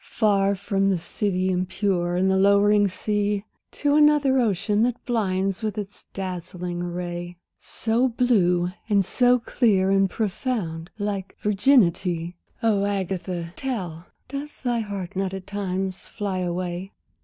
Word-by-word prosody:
Far 200 Hz, -3 st, +2 dB
from 195 Hz, 0 st, 0 dB
the 190 Hz, -, +2 dB
city 185 Hz, +1 st, -1 dB
impure 180 Hz, -1 st, 0 dB
and 185 Hz, +2 st, +2 dB
the 190 Hz, -, +3 dB
lowering 200 Hz, +1 st, +5 dB
sea, 205 Hz, +2 st, -1 dB, 0.3 s
To 290 Hz, 0 st, +1 dB
another 295 Hz, -3 st, +5 dB
ocean 210 Hz, -2 st, +1 dB
that 245 Hz, +1 st, 0 dB
blinds 195 Hz, -4 st, 0 dB
with 215 Hz, -1 st, -3 dB
its 205 Hz, -1 st, -6 dB
dazzling 180 Hz, -2 st, -5 dB
array, 175 Hz, 0 st, -5 dB, 0.2 s
So 230 Hz, +3 st, 0 dB
blue 185 Hz, -8 st, +2 dB, 0.2 s
and 200 Hz, -2 st, +3 dB
so 245 Hz, +4 st, +4 dB
clear 210 Hz, -5 st, +2 dB
and 195 Hz, 0 st, +3 dB
profound, 190 Hz, -6 st, -2 dB
like 205 Hz, -2 st, -3 dB
virginity? 185 Hz, -6 st, +2 dB, 0.3 s
Oh, 210 Hz, -3 st, +3 dB
Agatha, 185 Hz, -3 st, -2 dB
tell! 180 Hz, -11 st, -4 dB, 0.2 s
does 280 Hz, +2 st, -7 dB
thy 240 Hz, -2 st, +1 dB
heart 200 Hz, -4 st, -5 dB
not 195 Hz, 0 st, -1 dB
at 190 Hz, -1 st, -7 dB
times 190 Hz, -2 st, -3 dB
fly 200 Hz, -4 st, -3 dB
away? 180 Hz, +1 st, -3 dB
195 Hz, 130 wpm, -24 LUFS, 180-215 Hz, 0.3 s, lowering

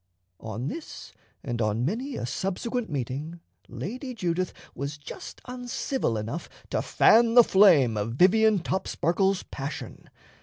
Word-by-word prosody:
On 115 Hz, +3 st, -5 dB
this, 320 Hz, +2 st, -7 dB, 0.3 s
and 120 Hz, -3 st, -3 dB
on 110 Hz, +2 st, 0 dB
many 245 Hz, -, -2 dB
a -, -, -3 dB
subsequent 220 Hz, -, -3 dB
meeting, 145 Hz, +4 st, -4 dB, 0.3 s
Lady 255 Hz, -, -6 dB
Judith 180 Hz, -3 st, -1 dB, 0.2 s
was 140 Hz, +2 st, -5 dB
just 145 Hz, +1 st, -9 dB
uncivil 250 Hz, -, -2 dB
enough 110 Hz, +11 st, -5 dB, 0.2 s
to -, -, +1 dB
fan 230 Hz, +1 st, +4 dB
the 240 Hz, -, +10 dB
flame 170 Hz, -, +5 dB
of 105 Hz, +2 st, -2 dB
Vivian 215 Hz, -, +5 dB
Topsparkle's 190 Hz, +1 st, 0 dB
passion. 140 Hz, +1 st, -7 dB
180 Hz, 125 wpm, -27 LUFS, -, 0.3 s, the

